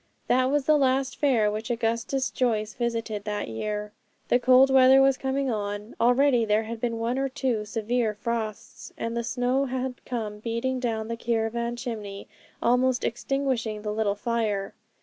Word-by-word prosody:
That 255 +1 +3
was 280 +1 +1
the 305 0 +4
last 265 0 +1
fair 235 -8 +2
which 215 +1 -4
Augustus 235 +3 -1
Joyce 215 -4 0
visited 230 -3 -2
that 210 - -3
year. 210 - -4 0.4
The 245 - +4
cold 255 +2 +6
weather 265 0 +7
was 270 0 +5
coming 265 0 -1
on; 205 0 -4
already 245 +1 +4
there 215 0 +2
had 225 0 -6
been 235 -2 -1
one 235 +3 -1
or 270 0 0
two 255 -6 -1
severe 225 +1 -1
frosts, 220 -1 -5
and 230 0 -3
the 235 - -1
snow 250 +3 0
had 255 -1 -4
come 215 -4 -4
beating 230 +4 -2
down 225 -3 -2
the 230 - -3
caravan 235 +1 -1
chimney, 215 -5 -6 0.4
almost 250 +1 +2
extinguishing 235 -4 -1
the 210 -1 -2
little 210 -2 0
fire. 210 -3 -1
235 Hz, 165 wpm, -26 LUFS, 215-255 Hz, 0.4 s, weather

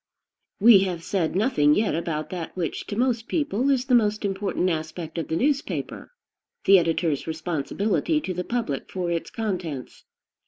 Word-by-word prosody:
We 215 -1 +8
have 180 -3 -2
said 175 -4 -1
nothing 150 - +3
yet 215 0 +1
about 160 -2 -3
that, 180 -1 -6
which, 170 -3 -3
to 205 - -4
most 235 -1 0
people, 275 - 0
is 265 -2 +2
the 260 - 0
most 215 -3 +3
important 195 -1 -1
aspect 160 0 -3
of 165 - -4
the 160 - -2
newspaper, 280 - -1 0.6
the 195 -1 +8
editor's 165 -3 0
responsibility 175 - -1
to 185 - -3
the 180 +1 -3
public 215 - -3
for 180 -2 -2
its 170 -1 -2
contents. 180 - -5
185 Hz, 160 wpm, -25 LUFS, 165-225 Hz, 0.6 s, We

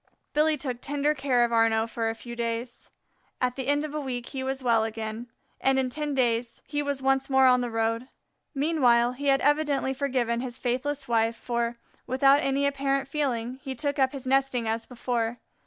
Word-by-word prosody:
Billy 305 +1 +3
took 255 -3 -4
tender 290 +1 +1
care 270 -4 +2
of 235 - -4
Arnaux 225 -1 +3
for 225 0 -2
a 225 - -3
few 235 +1 -9
days. 235 +1 -4 0.5
At 250 -1 0
the 265 -1 -4
end 290 +1 +2
of 300 - -7
a 305 - -2
week 250 -3 -4
he 265 - -4
was 265 0 -3
well 230 -3 +3
again, 220 +1 -4 0.3
and 265 0 +2
in 260 -1 0
ten 295 0 -3
days 235 -2 0
he 290 0 -2
was 285 -2 -3
once 270 0 +2
more 265 0 +5
on 250 -1 +5
the 245 - -2
road. 225 +2 -1 0.5
Meanwhile 255 -5 +3
he 280 +3 -5
had 270 -1 +4
evidently 290 -2 +2
forgiven 250 -4 0
his 255 -1 -6
faithless 270 +3 -2
wife, 230 -1 +2
for, 235 0 -2 0.3
without 275 +2 +5
any 275 -1 +1
apparent 275 -1 0
feeling, 260 -4 -2
he 265 -2 -5
took 285 +2 -2
up 260 -1 +3
his 275 -3 -8
nesting 265 -3 +1
as 225 +1 -2
before. 240 -1 -2
260 Hz, 195 wpm, -27 LUFS, 235-275 Hz, 0.5 s, more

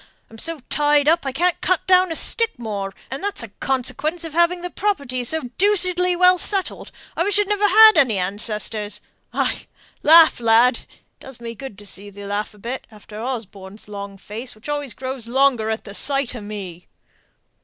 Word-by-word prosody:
I'm 225 - -12
so 330 0 -4
tied 295 -1 +2
up 325 -2 +3
I - - -1
can't 350 +6 0
cut 370 0 +1
down 370 -1 +4
a - - -2
stick 460 +4 0
more, 205 -4 -4 0.2
and 270 +7 -5
that's 405 -11 -2
a 230 - -8
'consequence' 270 - -2
of 325 -2 -7
having 345 +1 +2
the 355 - -4
property 280 -12 -2
so 250 -1 -1
deucedly 365 -3 +2
well 365 0 +5
settled; 390 0 -3 0.2
I - - -2
wish 405 +2 +1
I'd 415 -1 +2
never 415 0 +2
had 435 -2 +8
any 250 -9 +4
ancestors. 210 +2 -2 0.3
Ay, - - -2 0.3
laugh, 320 -1 +7
lad! 235 +1 +4
it - - -18 0.3
does 265 -3 -10
me 230 -1 -6
good 250 -3 -9
to 205 - -11
see 200 +1 -7
thee 200 0 -10
laugh 205 +1 -3
a - - -18
bit, 240 +6 -6
after 215 0 -11
Osborne's 210 -5 -6
long 200 -1 -7
face, 220 +6 -7
which 215 - -14
always 290 -6 -3
grows 260 -3 -6
longer 250 -3 +2
at 220 -2 -5
sight 275 -1 -1
o' 235 - -6
me!" 195 -4 -8
260 Hz, 185 wpm, -21 LUFS, 215-340 Hz, 0.3 s, had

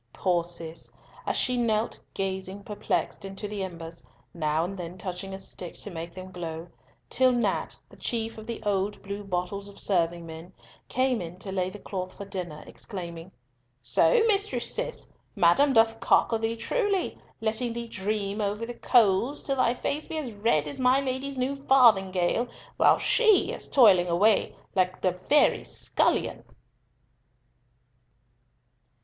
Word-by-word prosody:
Poor 175 -3 +1
Cis, 170 -1 -6 0.4
she 250 -1 +1
knelt 225 -2 0 0.2
gazing 190 +1 -3
perplexed 210 -1 -2
into 195 +2 -6
the 205 -1 -4
embers, 165 -4 -7 0.3
now 155 -1 0
and 190 +3 -4
then 175 -1 -7
touching 185 +1 -5
a 190 - -5
stick 180 -2 -7
to 205 - -7
make 165 0 -6
them 185 +1 -9
glow, 170 -1 -6 0.4
till 260 - +3
Nat, 235 -5 0
the - - -17
chief 225 -1 -3
of 220 - -11
"the 235 - -5
old 200 0 0
blue 200 +1 -5
bottles 195 +1 -3
of 200 - -13
serving 170 -3 +2
men," 165 +3 -10 0.4
came 255 -3 +1
in 170 +1 -7
to 190 +1 -6
lay 185 -1 0
the 210 - -9
cloth 185 -2 -5
for 200 - -7
dinner, 180 -6 -6
exclaiming, 170 -3 -8 0.5
"So, 125 - +4
Mistress 395 - 0
Cis! - - -4 0.3
Madam 175 +12 +5
doth 225 -2 +4
cocker 225 - +3
thee 225 +1 -1
truly, 400 - -1 0.2
letting 225 +2 -1
thee 235 0 -5
dream 205 0 -2
over 210 +2 -1
the 240 - -6
coals, 235 +3 +3
till 275 -1 -1
thy 245 -1 +3
face 295 +4 -2
be 320 - -4
as 265 -7 -4
red 205 -8 +1
as 145 - -5
my 255 +1 +4
Lady's 270 0 -3
new 260 +2 0
farthingale, 225 -6 +4 0.3
while - - +6
she 435 -5 +4
is - - -6
toiling 200 -10 +6
away 200 +5 +3 0.2
like 185 0 0
a 185 - +4
very 185 +12 +3
scullion." - - 0
200 Hz, 155 wpm, -27 LUFS, 180-235 Hz, 0.5 s, while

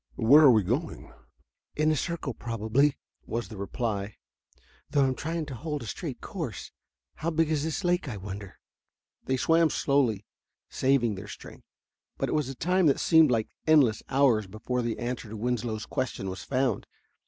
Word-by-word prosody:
Where 140 +7 +6
are - - +9
we 110 -3 +4
going?" 130 - -3 0.6
"In 155 +1 +2
a - - +2
circle, 155 -3 -3
probably," 115 +6 0 0.3
was 115 +1 -3
the 110 - -8
reply, 100 0 -3 0.7
"though 140 -2 +3
I'm 130 - +1
trying 160 +4 -3
to 145 - -7
hold 150 +2 -4
a - - -7
straight 100 - -6
course. - - -6 0.5
How 165 - -1
big 160 -1 +1
is 150 -2 0
this 160 +4 -2
lake, 175 -4 +1
I 105 - -5
wonder?" 100 0 -8 0.7
They 130 - 0
swam 165 +4 +3
slowly, 125 -10 +1 0.5
saving 130 -4 +2
their 100 +1 -8
strength, - - -11 0.5
but - - -1
it - - -1
was 150 -4 0
a 135 - -6
time 180 +5 +2
that 140 - +3
seemed 160 -2 +5
like 115 -3 0 0.2
endless 140 -9 +5
hours 130 -7 +3
before 110 +5 -3
the 115 -1 -2
answer 120 -2 -4
to 110 - -7
Winslow's 115 -1 -2
question 110 -7 -3
was 95 - -7
found. 130 -5 -1
130 Hz, 175 wpm, -28 LUFS, 110-150 Hz, 0.7 s, are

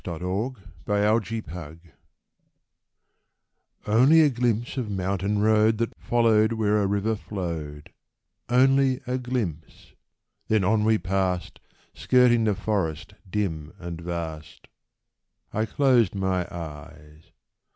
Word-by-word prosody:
THE 85 -3 -5 0.7
MOUNTAIN 110 +2 +1
ROAD 80 -3 -8 2.1
Only 130 +10 +5
a 150 - +5
glimpse 120 -1 -1
of 125 -5 -3
mountain 100 +1 -1
road 110 0 +3
That 115 +1 -2
followed 115 -2 +2
where 105 -2 +1
a 100 - +1
river 100 +3 0
flowed; 85 -8 -6 0.6
Only 130 +1 +3
a 125 +1 -2
glimpse 115 - -5 0.3
— - - -50
then 110 -2 +2
on 105 +3 +2
we 110 0 +4
passed 90 -1 -2 0.3
Skirting 120 -2 +3
the 105 -2 +1
forest 95 -3 -2 0.2
dim 80 -7 -3
and 85 -1 -7
vast. 85 -3 -6 0.9
I 110 +1 0
closed 120 -5 +2
my 95 -2 -1
eyes. 75 -1 -10
105 Hz, 110 wpm, -25 LUFS, 85-115 Hz, 2.1 s, Only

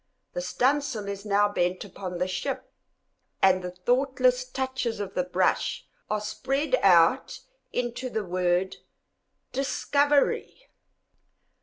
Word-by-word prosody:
The - - -2
studding 290 - +2
sail 235 -8 -5
is 200 +1 -5
now 205 0 +4
bent 185 -1 -1
upon 185 -2 -6
the 180 +1 0
ship, 185 - -4 0.7
and 185 -1 +4
the 180 - -3
thoughtless 250 +6 +1
touches 260 -4 -2
of 200 -2 -4
the 180 - 0
brush 180 +1 0 0.2
are 215 - 0
spread 260 - -2
out - - +4 0.3
into 245 +1 -2
the 220 -3 -3
word 180 +1 0 0.7
DISCOVERY. 285 - +1
215 Hz, 120 wpm, -27 LUFS, 185-260 Hz, 0.7 s, now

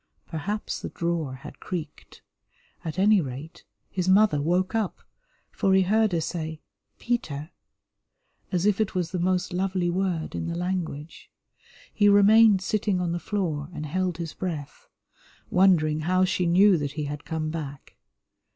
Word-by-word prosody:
Perhaps 195 +7 -4
the - - -5
drawer 170 -6 -2
had 145 +3 -11
creaked; 160 -5 -7 0.6
at 160 +1 -5
any 205 +1 +5
rate, 140 +3 -8 0.3
his 185 -1 -1
mother 190 -6 +4
woke 180 +6 +1
up, 220 -4 -2 0.5
for 190 -1 +2
he 190 - +5
heard 215 +3 +2
her 170 -2 0
say 160 -1 -4 0.4
"Peter," 160 -10 -3 1.0
as 180 -1 0
if 210 0 +3
it 210 - -1
was 180 -3 -1
the 185 - -2
most 180 0 0
lovely 185 -1 0
word 180 -3 -1
in - - -3
the 170 - -3
language. 170 -4 -4 0.6
He 205 -1 +4
remained 205 0 +6
sitting 205 -2 0
on 175 -1 -1
the 175 - -2
floor 165 -6 -2
and 155 - -4
held 180 +2 -1
his 165 -2 -5
breath, 155 -6 -6 0.6
wondering 165 -5 +4
how 185 +4 +2
she 180 -1 0
knew 185 +1 +5
that 145 -1 -3
he 150 0 -3
had 145 0 -5
come 155 -1 -3
back. 145 -4 -7
175 Hz, 155 wpm, -26 LUFS, 155-190 Hz, 1.0 s, remained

